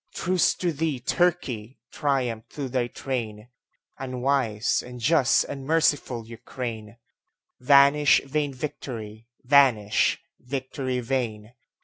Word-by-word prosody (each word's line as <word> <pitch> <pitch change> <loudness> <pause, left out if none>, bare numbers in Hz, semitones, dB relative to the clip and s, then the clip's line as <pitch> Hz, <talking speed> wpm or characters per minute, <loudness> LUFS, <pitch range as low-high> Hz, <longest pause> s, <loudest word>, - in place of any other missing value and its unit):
Truce 180 0 +1
to 175 -2 -1
thee, 155 -3 -2
Turkey! 130 -7 -1
Triumph 125 -5 -1
to 140 -2 -4
thy 125 -1 -1
train, 120 -3 -5 0.5
Unwise, 130 -4 0
unjust, 125 +3 +2
unmerciful 140 -4 0
Ukraine! 115 -1 -7 0.6
Vanish 140 +2 +5
vain 145 +1 -1
victory! 115 -6 -7 0.2
vanish, 125 -6 +3 0.2
victory 130 0 -4
vain! 115 -3 -3
130 Hz, 90 wpm, -25 LUFS, 115-140 Hz, 0.6 s, Vanish